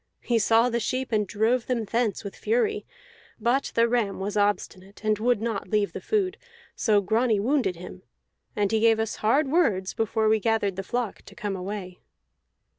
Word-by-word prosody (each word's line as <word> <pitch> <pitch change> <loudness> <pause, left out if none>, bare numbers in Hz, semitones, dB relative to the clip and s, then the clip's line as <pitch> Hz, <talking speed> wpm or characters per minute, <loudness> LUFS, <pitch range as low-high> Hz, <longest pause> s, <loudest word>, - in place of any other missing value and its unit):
He 235 -2 +1
saw 225 +2 +4
the 235 -1 0
sheep, 255 +3 -2
and 210 -2 +1
drove 225 +5 +1
them 235 -3 -1
thence 225 -1 -1
with 200 - -7
fury; 435 -2 0 0.5
but 255 +4 +1
the 230 0 +4
ram 230 -5 0
was 200 +2 -3
obstinate, 205 -1 -1
and 215 -1 +2
would 240 0 +2
not 225 -2 -3
leave 210 -2 0
the - - -6
food, 390 -4 0 0.4
so 210 -3 +3
Grani 220 +2 +1
wounded 245 -3 +1
him. 180 +2 -10 0.5
And 205 -1 0
he 220 - +2
gave 225 0 +4
us 220 -1 -2
hard 270 +8 +2
words 205 - +1
before 220 0 0
we 220 0 +3
gathered 220 -3 0
the 195 - -3
flock 235 +2 -3
to - - -13
come 205 -4 -3
away." 185 -1 -6
220 Hz, 185 wpm, -26 LUFS, 205-240 Hz, 0.5 s, saw